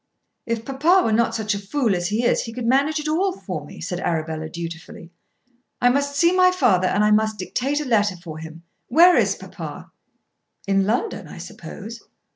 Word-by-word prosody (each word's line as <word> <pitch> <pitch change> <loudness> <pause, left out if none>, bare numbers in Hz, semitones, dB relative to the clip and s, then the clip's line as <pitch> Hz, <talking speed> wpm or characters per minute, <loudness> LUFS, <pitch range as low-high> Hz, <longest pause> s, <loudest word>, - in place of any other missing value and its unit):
"If 230 -1 -2
papa 310 +8 +3
were 225 - +1
not 230 +2 +2
such 215 -1 -1
a 200 - -3
fool 225 +2 0
as 175 0 -1
he 220 +5 -1
is, - - +2
he 230 - -7
could 245 0 -5
manage 280 +6 +2
it 300 - -4
all 365 +5 +1
for - - -5
me," - - -12
said 180 -2 -4
Arabella 160 -2 -2
dutifully. 170 0 -8 0.7
"I 245 - +4
must 280 +2 0
see 340 +4 +4
my 365 0 +6
father 190 - +2
and 200 +3 +1
I 210 - +3
must 215 0 +2
dictate 265 +9 -2
a 300 - -4
letter 210 -6 +2
for 165 -3 -9
him. 160 +1 -10 0.2
Where 345 +7 +6
is - - +2
papa?" - - -9 0.7
"In 195 -1 +1
London, 240 - -1
I - - -11
suppose." 230 +2 -9
225 Hz, 195 wpm, -22 LUFS, 185-285 Hz, 0.7 s, my